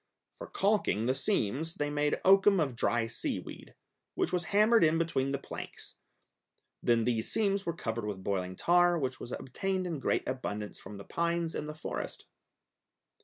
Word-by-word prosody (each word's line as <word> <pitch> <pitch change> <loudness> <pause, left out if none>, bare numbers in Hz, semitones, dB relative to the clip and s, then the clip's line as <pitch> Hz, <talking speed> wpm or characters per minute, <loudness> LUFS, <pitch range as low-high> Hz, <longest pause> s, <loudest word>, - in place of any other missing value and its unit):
For - - -7
calking 195 - +1
the 130 - +2
seams 160 - -1
they 145 0 -2
made 145 0 +1
oakum 195 0 +6
of 140 -6 0
dry 120 0 +1
seaweed, 115 0 -5 0.4
which - - 0
was 175 -1 0
hammered 215 +2 +4
in 160 0 +4
between 150 -5 0
the 140 - 0
planks; - - -9 0.9
then 115 -1 +3
these 115 -1 0
seams 200 -3 +1
were 170 - -1
covered 115 -6 -3
with 95 -3 -5
boiling 95 -2 -2
tar, 175 - +4
which 130 -4 -2
was 120 - -8
obtained 185 +8 -2
in 165 -5 -3
great - - 0
abundance 105 -5 -4
from 105 - -9
the 100 - -10
pines 170 -1 -1
in - - -3
the 150 0 -6
forest. 155 - -5
150 Hz, 170 wpm, -31 LUFS, 115-175 Hz, 0.9 s, oakum